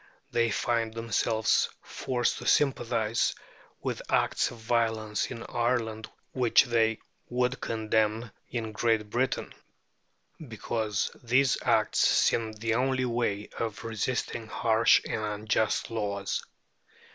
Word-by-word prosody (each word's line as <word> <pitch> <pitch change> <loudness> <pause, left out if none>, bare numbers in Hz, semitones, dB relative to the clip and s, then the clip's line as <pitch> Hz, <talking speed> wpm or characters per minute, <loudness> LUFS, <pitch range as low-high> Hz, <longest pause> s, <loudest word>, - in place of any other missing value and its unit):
They 115 -1 +2
find 115 +1 0
themselves 115 -1 +1
forced 120 -2 -1
to - - -6
sympathize 115 -5 +2 0.5
with - - -2
acts - - +2
of 120 - -10
violence 110 -2 0
in 115 - -6
Ireland 115 -2 -1 0.2
which 125 -3 +5
they 115 -3 +2 0.3
would 125 +2 0
condemn 110 0 0 0.2
in 115 -2 -3
Great 110 -2 0
Britain, 130 +2 -1 0.9
because 110 -2 -2
these 130 +2 +3
acts - - +2
seem 115 -1 +3
the 110 +1 -2
only 130 +1 +1
way 115 -4 -1
of 110 -3 -3
resisting 115 +1 -2
harsh 115 0 +4
and 110 - -2
unjust 110 +2 0
laws. 100 -3 -2
115 Hz, 110 wpm, -28 LUFS, 110-120 Hz, 0.9 s, which